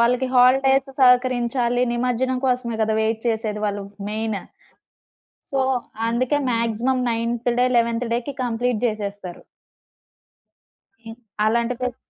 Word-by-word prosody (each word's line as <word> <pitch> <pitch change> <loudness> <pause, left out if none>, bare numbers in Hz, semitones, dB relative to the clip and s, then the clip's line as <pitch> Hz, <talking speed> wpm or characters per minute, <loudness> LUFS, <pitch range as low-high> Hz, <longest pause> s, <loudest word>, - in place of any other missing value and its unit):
వాళ్ళకి 250 +2 +2
హాలిడేస్ 265 +2 +4
సహకరించాలి. 250 -1 +3
నిమజ్జనం 250 +1 0
కోసమే 245 -3 -1
గదా! 220 0 +1
వెయిట్ 220 0 -1
చేసేది 220 -2 -2
వాళ్ళు 205 -1 -3 0.3
మెయిన్. 220 -1 -2 1.1
సో, 275 - 0 0.5
అందుకే 250 +5 0
మాక్సిమం 235 +2 0
నైన్త్ 230 +1 -1
డే, 250 - +4
11థ్ 235 +1 +1
డేకి 245 +4 -3
కంప్లీట్ 240 -1 -1
జేసేస్తారు. 205 -5 -4 1.7
ఇ - - -6 0.4
అలాంటి 235 +2 +1
ఫెస్ 250 -1 -3
235 Hz, 110 wpm, -22 LUFS, 225-250 Hz, 1.7 s, హాలిడేస్